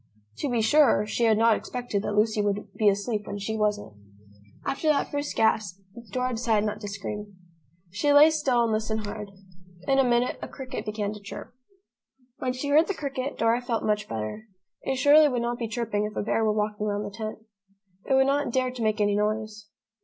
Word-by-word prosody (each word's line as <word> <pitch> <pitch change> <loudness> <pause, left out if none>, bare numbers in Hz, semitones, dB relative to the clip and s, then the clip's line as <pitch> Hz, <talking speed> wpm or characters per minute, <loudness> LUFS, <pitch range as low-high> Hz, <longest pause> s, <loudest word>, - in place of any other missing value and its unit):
To 290 - -2
be 235 -3 +1
sure, 265 -4 +4
she 230 +2 0
had 220 -2 +4
not 225 0 +5
expected 245 -5 -3
that 205 - -3
Lucy 215 0 +2
would 205 0 -2
be 215 -2 +3
asleep 210 +1 -2
when 205 - -4
she 205 +2 -3
wasn't. 210 - -1 0.7
After 290 +3 -2
that 300 -2 +2
first 290 0 -3
gasp, 215 -4 +1 0.3
Dora 255 +4 -1
decided 225 -2 +1
not 210 0 -3
to 205 - -5
scream. 205 0 -6 0.6
She 220 +10 +1
lay 295 +2 +8
still, 270 -6 +2
and 230 - 0
listened 220 0 -1
hard. 205 0 -6 0.6
In 270 0 +3
a - - +6
minute, 245 0 +1
a - - -5
cricket 260 -4 -7
began 210 -1 -2
to 210 - -9
chirp. 205 +3 -9 0.9
When 255 - -1
she 260 +3 -4
heard 310 +3 +5
the 395 - -2
cricket, 275 -2 -4
Dora 230 +2 +2
felt 240 -2 -2
much 210 -1 0
better. 110 - -5 0.4
It 270 - -2
surely 290 +3 +6
would 245 -3 -1
not 240 0 -2
be 230 - -2
chirping 220 -2 -2
if 210 -1 -6
a - - -1
bear 225 +1 0
were 215 - +3
walking 210 0 -1
round 205 0 -2
the 205 -1 -8
tent. 220 -1 -5 0.7
It 270 - +4
would 265 0 +5
not 280 0 +1
dare 255 0 0
to 250 -1 -7
make 215 -1 +1
any 205 -1 +2
noise. 215 0 -2
220 Hz, 205 wpm, -26 LUFS, 210-255 Hz, 0.9 s, lay